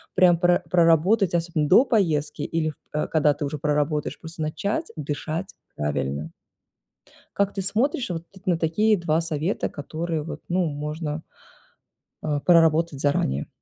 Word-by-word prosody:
прям 180 -2 +5
про 175 0 +4
проработать, 175 +4 +4
особенно, 165 -3 0
до 235 - +7
поездки 155 - +1
или 160 -1 -1 0.2
в 150 - -1
когда 150 -2 +3
ты 145 +1 -4
уже 145 +2 -3
проработаешь, 150 0 -1
просто 160 0 -9
начать 200 - -2
дышать 155 +4 -4 0.2
правильно. 75 +1 -2 1.0
Как 200 0 +1
ты 195 - -2
смотришь 235 +7 0
вот 165 -1 -4 0.2
на 175 -3 +2
такие 210 +7 +2
2 160 -2 +1
совета, 165 +3 -2
которые, 160 +2 -4
вот, 160 - -7
ну, 180 +1 +1
можно, 150 +1 -4 1.0
э, 150 -2 -1
проработать 165 -3 +4
заранее? 70 - 0
160 Hz, 135 wpm, -24 LUFS, 150-175 Hz, 1.0 s, до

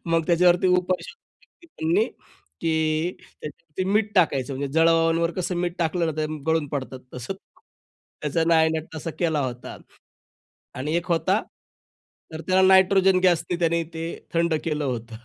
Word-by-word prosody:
मग 165 -1 +1
त्याच्यावरती 175 +1 +4
उपाय 180 0 -1
केले 350 -6 -17
त्यांनी 330 +6 0 0.6
की 160 +1 0
त्याच्यावरती 165 +3 -8
मीठ 210 0 +1
टाकायचं. 140 -8 +2
म्हणजे 140 +1 -3
जळावांवर 165 +1 +3
कसं 180 -1 -2
मीठ 175 0 -1
टाकलं 170 0 0
ना 160 - -1
ते 155 - 0 0.2
गळून 160 -2 +1
पडतात 130 -2 -5
तसंच. 125 +10 -5 0.9
त्याचा 150 +2 0
नायनाट 160 -1 +3
तसा 160 +1 -5
केला 160 -4 +1
होता 125 -1 -7 1.0
आणि 145 +5 -3
एक 175 - -2
होता 190 +5 +2 0.9
तर 160 - -6
त्याला 185 0 +3
नायट्रोजन 190 0 +5
गॅसनी 175 -1 +2
त्याने 170 -1 +1
ते 165 0 -4 0.3
थंड 170 -1 +2
केलं 150 -2 -1
होतं. 115 -2 -5
165 Hz, 140 wpm, -24 LUFS, 155-180 Hz, 1.0 s, नायट्रोजन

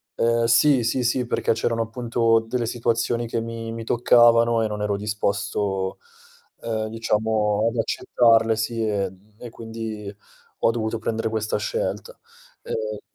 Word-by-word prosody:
Ehm, 115 0 +2
sì, 125 +2 +4
sì, 125 +2 0
sì 125 +1 +1
perché 120 - 0
c'erano 115 0 -1
appunto 115 0 +1
delle 120 -1 -1
situazioni 115 0 -1
che 115 0 -2
mi 115 0 -6
mi 115 0 -6
toccavano 115 -1 +4
e 110 - +1
non 105 0 -5
ero 105 -1 0
disposto, 100 -2 -2 0.6
uhm, 110 -1 -2
diciamo 110 -1 0
ad 120 - -7
accettarle, 115 -1 +3
sì, 110 +1 -2
ehm, 100 0 -4
e 120 - -8
quindi 110 -3 -7 0.4
ho - - +3
dovuto 110 -1 -2
prendere 110 0 -2
questa 110 -1 -1
scelta, - - -3 0.5
ehm 480 +1 -4
115 Hz, 140 wpm, -23 LUFS, 110-120 Hz, 0.6 s, sì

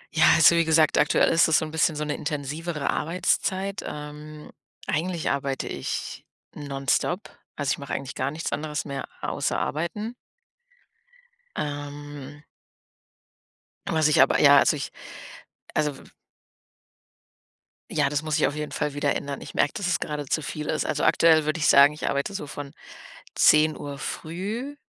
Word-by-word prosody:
Ja, 160 - +5
also, 160 +1 +7
wie 170 - +4
gesagt, 160 -1 +3
aktuell 150 +1 +3
ist 165 0 +5
das 160 - +4
so - - 0
'n 155 - -8
bisschen 160 0 +1
so 150 - -2
'ne 150 - -2
intensivere 150 +1 -4
Arbeitszeit. 190 +4 -1
Ähm, 150 +1 -8 0.3
eigentlich 170 +1 -1
arbeite 140 -1 -2
ich - - -5 0.3
nonstop, 140 +6 -2 0.2
also, 145 -3 -1
ich - - 0
mache 140 - -6
eigentlich 135 -1 -4
gar 130 +1 -2
nichts 155 +3 -4
anderes 150 -1 -3
mehr 140 -1 -5 0.2
außer - - -1
arbeiten. 210 +9 -3 1.4
Ähm 145 0 -6 1.5
was 160 -1 +3
ich 155 - +5
aber 135 - +4
ja 140 -1 +7
also - - +3
ich 140 - -5 0.8
also, 150 -2 0
w - - -14 1.9
ja, - - +2
das 150 0 -1
muss 155 -1 -1
ich - - +4
auf 145 - -4
jeden 150 0 -4
Fall 150 -1 -2
wieder 145 0 0
ändern. 140 -1 -5
Ich - - -9
merke, 145 - +1
dass 200 -3 -2
es 180 - +1
gerade 150 -1 -4
zu 155 +4 -1
viel 150 0 -5
ist. 155 - -1
Also, 145 - -1
aktuell 160 -2 +4
würde 155 +2 -1
ich 150 - +2
sagen, 140 +2 +7
ich 150 - -5
arbeite 140 +8 -1
so 195 -7 -5
von 140 -1 -7 0.6
10:00 150 -2 +3
früh, 205 - -5
150 Hz, 160 wpm, -25 LUFS, 145-160 Hz, 1.9 s, also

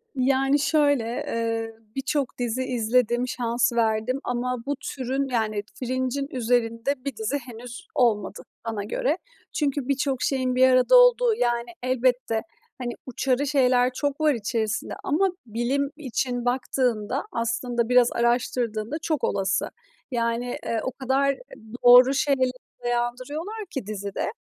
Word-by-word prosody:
Yani, 270 +2 +2
şöyle, 285 -3 +3 0.2
eee, 225 -1 -2 0.2
birçok 270 -1 -1
dizi 245 +1 -1
izledim, 245 0 +1
şans 240 -1 0
verdim 225 +3 +1
ama 245 +1 -1
bu 285 - -1
türün, 270 +1 -3
yani, 215 -4 -1
Fringe'in 260 +2 -2
üzerinde 245 +2 0
bir 275 -3 -3
dizi 220 +6 -1
henüz 245 -1 -10
olmadı 220 -6 +1 0.2
bana 220 -3 -3
göre. 270 - 0 0.4
Çünkü 285 -5 -1
birçok 270 -1 0
şeyin 255 -2 0
bir 260 +1 +6
arada 255 - +5
olduğu, - - +6
yani, 240 - 0
elbette, 255 -3 +1 0.4
hani, 245 -2 -4
uçarı 260 +2 0
şeyler 255 -3 +3
çok 285 +2 -2
var 305 -2 +4
içerisinde 220 -1 -2
ama 370 +7 +2 0.2
bilim 250 +5 -1
için 250 -3 -2
baktığında 250 -1 0
aslında 230 -1 -1
biraz 250 -1 +5
araştırdığında 235 0 0
çok 315 -4 -1
olası. 195 0 0 0.4
Yani, 235 +1 -1
eee, 230 - 0
o 260 - -2
kadar 270 +2 +1 0.5
doğru 250 +2 +9
şeylere 275 -2 +2 0.3
dayandırıyorlar 255 - -2
ki 270 -8 -4
dizide, 200 -2 -3
250 Hz, 130 wpm, -25 LUFS, 235-275 Hz, 0.5 s, doğru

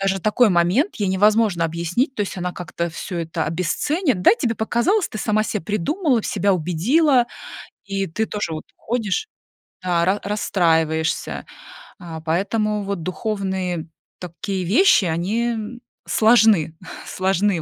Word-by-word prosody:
даже 195 0 0
такой 215 +4 +3
момент 185 - +2
ей 205 -4 -1
невозможно 205 -2 +3
объяснить, 170 - -1
то - - -5
есть 195 - -5
она 180 0 -3
как-то 170 -1 -4
всё 175 +2 -5
это 165 -1 -2
обесценит. 220 - 0
Да, - - +7
тебе 235 -1 -1
показалось, 275 - +1
ты 215 - -7
сама 215 0 +1
себе 210 -5 -3
придумала, 235 - 0
себя 200 0 +1
убедила, 240 - +2 0.6
и 195 -1 -2
ты 215 +7 -2
тоже 205 -6 -3
вот 155 - -6
ходишь 230 - -2 0.6
да, 175 -2 +1
ра 190 +3 +1
расстраиваешься. 165 -6 0 0.6
А, 165 -3 -7
поэтому 205 +6 0
вот 200 -3 -3
духовные 185 -3 -3 0.3
такие 180 +2 -4
вещи, 220 - +4
они, 185 +8 0
э, 235 - -1 0.5
сложны, 220 -8 +4 0.3
сложны 190 -1 0
195 Hz, 135 wpm, -21 LUFS, 170-220 Hz, 0.6 s, Да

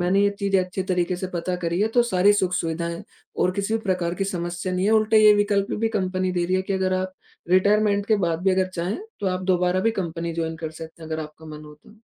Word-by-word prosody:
मैंने 185 +3 +2
ये 200 - +3
चीज़ें 195 -1 +2
अच्छे 185 +1 -4
तरीके 180 0 0
से 185 - -4
पता 180 +1 -2
करी 170 +1 -2
है, 215 - +2
तो 240 +2 +3
सारी 205 -3 +3
सुख-सुविधाएँ 170 -3 -1 0.3
और 180 - +2
किसी 200 +4 -2
भी 225 - 0
प्रकार 180 -3 -1
की 195 - -2
समस्या 175 -1 -3
नहीं 180 +1 0
है। - - +3
उल्टा 220 0 +3
ये 215 -1 +8
विकल्प 205 -1 +1
भी 225 - +2
कंपनी 185 0 -1
दे 175 -1 0
रही 185 +2 +1
है 185 - 0
कि 195 - -3
अगर 190 -1 0
आप 185 0 -4 0.4
रिटायरमेंट 205 +2 +3
के 220 - +3
बाद 165 +1 -2
भी 190 - +3
अगर 185 0 +2
चाहें, 175 - -2 0.2
तो 200 - -2
आप 185 -1 0
दोबारा 180 +1 +1
भी 225 - +2
कंपनी 170 -1 -4
जॉइन 160 -1 -3
कर 160 -1 -5
सकते 160 +1 -11
हैं 160 - -9
अगर 160 0 -2
आपका 155 +1 -12
मन 155 0 -9
हो 150 0 -12
तो। 180 +8 -20
185 Hz, 255 wpm, -23 LUFS, 170-200 Hz, 0.4 s, ये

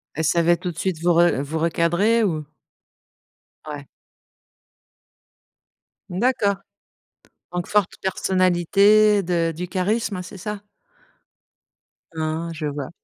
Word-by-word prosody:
Elle 160 - -2
savait 170 +2 +3
tout 180 +1 -4
de - - -15
suite 185 -4 -2
vous 175 -1 +4
re 170 -5 +3
vous 155 +3 -4
recadrer 170 +8 +2
ou? 155 -6 -1 1.2
Ouais. 145 -2 -7 2.2
D'accord. 205 +1 +1 1.0
Donc 175 -1 -3
forte 205 -3 +2
personnalité 195 +3 +3
de 170 -2 0
du 180 +1 -5
charisme 200 +1 -1
c'est 185 - -10
ça? 210 +2 -5 1.6
Ah, 160 +1 -2
je 155 -1 -4
vois. 145 -2 -5
175 Hz, 105 wpm, -22 LUFS, 165-200 Hz, 2.2 s, vous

